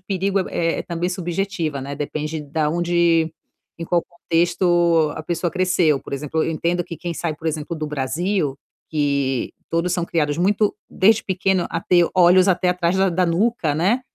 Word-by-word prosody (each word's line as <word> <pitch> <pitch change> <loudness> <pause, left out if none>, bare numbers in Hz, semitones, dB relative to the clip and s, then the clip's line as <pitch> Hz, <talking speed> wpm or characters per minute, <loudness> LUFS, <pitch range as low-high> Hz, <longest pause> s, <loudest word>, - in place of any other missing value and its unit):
perigo 195 +1 -1
é 165 0 0
é - - -3
também 175 +1 -3
subjetiva, 175 -4 -2
né, 140 +1 -5
depende 150 +1 -4
da 150 +1 -1
onde, 170 -1 +2 0.5
em 165 - -4
qual 170 0 +1
contexto 170 -2 +2
a 160 - -5
pessoa 170 +2 -1
cresceu 180 -5 +2
por - - -11
exemplo, 150 +3 -2
eu - - -1
entendo 170 +2 0
que 170 - -8
quem 175 -1 -5
sai 165 0 -2
por 160 - -8
exemplo 155 +2 -4
do 155 - -3
Brasil, 150 +2 -1 0.3
que 140 -4 0 0.2
todos 170 +2 0
são 175 -2 0
criados 150 -3 0
muito 205 +3 +2 0.2
desde 215 +3 +3
pequeno 190 -1 0
a 165 - -2
ter 175 -1 +3
olhos 185 +1 +5
até 180 0 +2
atrás 180 0 0
da 190 0 +3
da 180 +1 +1
nuca, 170 -3 +1
né. 195 - +2
170 Hz, 180 wpm, -21 LUFS, 155-180 Hz, 0.5 s, olhos